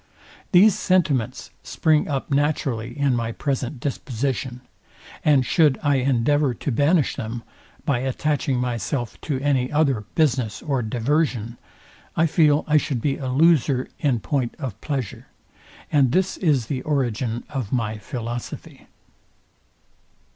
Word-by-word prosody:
These 200 +3 +7
sentiments 150 - 0
spring 155 -2 +1
up 140 0 -3
naturally 140 -5 0
in 140 -3 +2
my 115 -1 -2
present 130 0 -3
disposition; 130 -1 -3 0.6
and 140 -4 +4
should 150 -1 +3
I 145 -2 +3
endeavour 135 +1 +2
to 145 - -3
banish 145 +5 +2
them, 115 -2 -5 0.4
by 135 -4 +1
attaching 135 +1 -1
myself 125 0 -3
to 140 -4 -2
any 135 -3 +1
other 140 -8 +1
business 130 -8 +1
or 140 -4 0
diversion, 120 0 -1 0.6
I 165 - +3
feel 150 -2 +3
I 155 0 +4
should 140 -4 0
be 135 +3 -1
a 135 - -5
loser 140 -2 +3
in 130 -6 +1
point 130 -2 -1
of 135 -8 -4
pleasure; 135 -7 -4 0.6
and 135 -4 +4
this 190 +5 +1
is 145 - +2
the 130 +1 -3
origin 120 -5 -1
of 130 -8 -4
my 110 -4 -1
philosophy. 120 +1 -7
135 Hz, 130 wpm, -23 LUFS, 120-150 Hz, 0.6 s, These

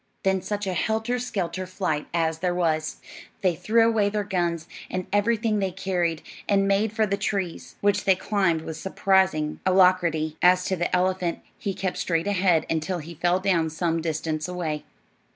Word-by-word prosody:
Then 190 -1 +2
such 205 +1 -3
a 190 - -1
helter 220 +6 0
skelter 185 -6 -3
flight 180 -5 -2
as 160 -1 0
there 180 0 0
was! 160 -3 0 0.5
They 185 -3 +2
threw 225 +6 +3
away 215 -3 +2
their 210 0 -1
guns 175 -4 -1 0.2
and 185 -1 -3
everything 215 +1 +2
they 195 -1 0
carried, 175 -3 -1 0.3
and 195 -1 +3
made 200 +2 +2
for 220 0 +1
the 200 -1 -1
trees, 195 -4 -3
which 205 0 +2
they 190 - +5
climbed 185 -4 +1
with 160 -1 -6
surprising 190 -5 +1
alacrity. 180 -4 +3
As 180 0 +5
to 190 - 0
the 175 0 0
elephant, 180 -1 0 0.2
he 195 -2 -3
kept 190 -2 -2
straight 165 0 0
ahead 185 -5 +2
until 165 +3 -1
he 170 +1 -8
fell 175 +3 +1
down 180 -4 +1
some 165 +1 -1
distance 155 -1 -2
away. 165 -4 -3
185 Hz, 170 wpm, -25 LUFS, 165-200 Hz, 0.5 s, they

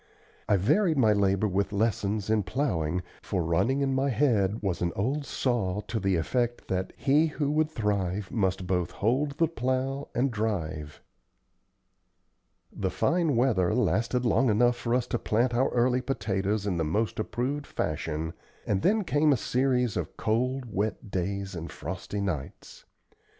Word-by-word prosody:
I 100 - +5
varied 155 - +2
my 110 -5 +5
labor 100 0 +2
with 100 0 0
lessons 105 -1 0
in 110 -1 +3
plowing, 90 - -1 0.2
for 95 -4 -1
running 95 +12 +1
in 135 -1 +1
my 135 +1 +1
head 110 -6 +1
was 95 -4 -1
an 85 -1 +1
"old 135 +8 -1
saw" 105 -6 0
to 110 +1 -3
the 95 -1 +1
effect 120 +8 -1
that 95 0 -1
"he 150 +4 +3
who 145 -2 -1
would 155 +1 +2
thrive 100 - -1
must 95 -4 0
both 90 -1 0
hold 135 +7 0
the 165 - +3
plow 130 -1 -2
and 130 +2 +2
drive." 80 -9 -3 1.7
The 95 -2 -1
fine 165 - +1
weather 110 -6 +2
lasted 125 0 +1
long 120 +2 +3
enough 120 +3 +4
for 120 0 -1
us 125 - +1
to 120 - -2
plant 120 +3 +1
our 130 +3 +2
early 125 +1 +2
potatoes 105 -5 -1
in 95 -4 0
the 80 - +1
most 105 +10 -1
approved 135 +6 -2
fashion, 80 +1 -3 0.3
and 95 -2 0
then 215 +2 +3
came 150 -3 +3
a 135 - +4
series 125 -1 +1
of - - -4
cold, 125 +4 0
wet 105 +1 -2
days 100 +2 -2
and 85 -1 -6
frosty 95 +5 -5
nights. 80 -9 -5
110 Hz, 160 wpm, -28 LUFS, 95-130 Hz, 1.7 s, I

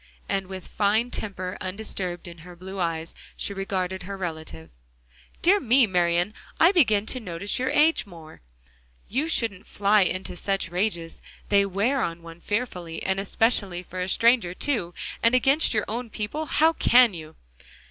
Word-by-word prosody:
And 195 -1 -1
with 190 -1 -8
fine 215 +4 +1
temper 185 -3 -5
undisturbed 185 -2 -4
in 170 -1 -11
her 175 +2 -12
blue 190 +2 -8
eyes, 165 -2 -2 0.2
she 200 - -2
regarded 190 -1 -3
her 195 +2 -6
relative. 160 - -6 0.7
"Dear 390 +4 +5
me, 255 - +4
Marian! 175 0 +1 0.3
I 335 - +6
begin 220 - +3
to 255 - -1
notice 195 -1 -3
your 260 - 0
age 310 -6 +3
more 165 -4 -13
now. - - -35 0.4
You 275 +9 -1
shouldn't 220 - -1
fly 205 +1 +3
into 185 0 -1
such 195 0 -1
rages; 175 -3 -2 0.3
they 200 -1 +4
wear 210 +8 0
on 165 0 -3
one 165 0 -12
fearfully; 180 -7 -3
and 190 0 0
especially 200 -3 0
for 185 +1 -8
a 180 +1 -2
stranger 230 -5 +3
too, 205 -12 -1 0.3
and 230 +2 +4
against 270 +5 +4
your 210 -3 +1
own 235 +2 -4
people 220 +10 -4
how 320 +4 +3
can 245 -7 +5
you?" 160 -2 -9
195 Hz, 165 wpm, -25 LUFS, 175-230 Hz, 0.7 s, I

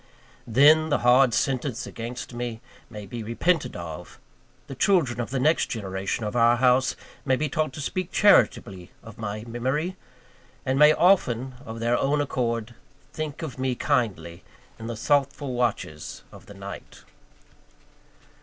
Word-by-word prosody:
Then, 150 +7 +5
the 145 - +2
hard 125 +1 +6
sentence 130 0 -1
against 120 +2 -7
me 120 -1 -4 0.3
may 105 -3 -8
be 115 +4 -7
repented 140 +10 0
of; 85 -3 -8 0.5
the - - -8
children 135 - +2
of 120 - -5
the 130 +1 -2
next 155 +5 +2
generation 95 0 -3
of 105 - -4
our 120 0 +5
house 130 +1 +3 0.3
may 130 -2 +2
be 150 +4 -1
taught 155 +1 -1
to 150 - -7
speak 185 +5 -3
charitably 100 - +3
of 115 -2 -13
my 105 -1 -4
memory, 130 +10 -2 0.7
and 130 +1 0
may 150 0 +8
often, 135 - +2
of 115 0 -7
their 120 +1 +1
own 145 +2 +1
accord, 120 -5 -2 0.4
think 155 -1 -5
of 135 -5 -6
me 130 -1 0
kindly 115 - -1 0.4
in 115 - -7
the 115 - -4
thoughtful 140 +1 0
watches 115 -11 -3
of - - -15
the - - -12
night. - - -10
125 Hz, 150 wpm, -25 LUFS, 115-145 Hz, 0.7 s, may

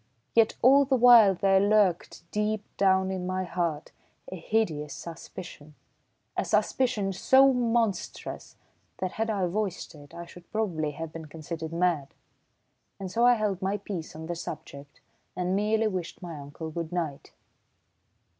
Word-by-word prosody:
Yet 225 -1 +4
all 275 +3 +7
the 270 -1 +1
while 235 -5 +7
there 195 +1 +3
lurked, 200 -3 +2
deep 210 0 -1
down 190 -1 +2
in 185 -1 -3
my 185 0 -1
heart, 170 -3 -3 0.4
a - - -4
hideous 165 -6 -1
suspicion, 165 -2 -10 0.6
a - - 0
suspicion 225 -7 0
so 265 +8 +5
monstrous 230 -4 -2 0.4
that 185 -1 -3
had 225 +1 -2
I 200 -4 0
voiced 190 -1 -3
it, 145 -2 -14
I 170 - -7
should 175 +1 -15
probably 175 -9 -1
have 160 +2 -7
been 165 -1 -7
considered 160 +1 -7
mad. 170 -5 0 0.8
And 190 -2 -5
so 235 +4 +3
I 245 - +6
held 210 -4 -1
my 195 +2 0
peace 185 -6 -7
on 160 +1 -7
the 175 - -3
subject 145 -3 -9 0.3
and 180 +1 -1
merely 215 +2 +1
wished 185 -5 -4
my 170 -3 -7
uncle 145 +3 -8
good 165 0 -5
night. 165 -6 -4
185 Hz, 150 wpm, -27 LUFS, 165-215 Hz, 0.8 s, all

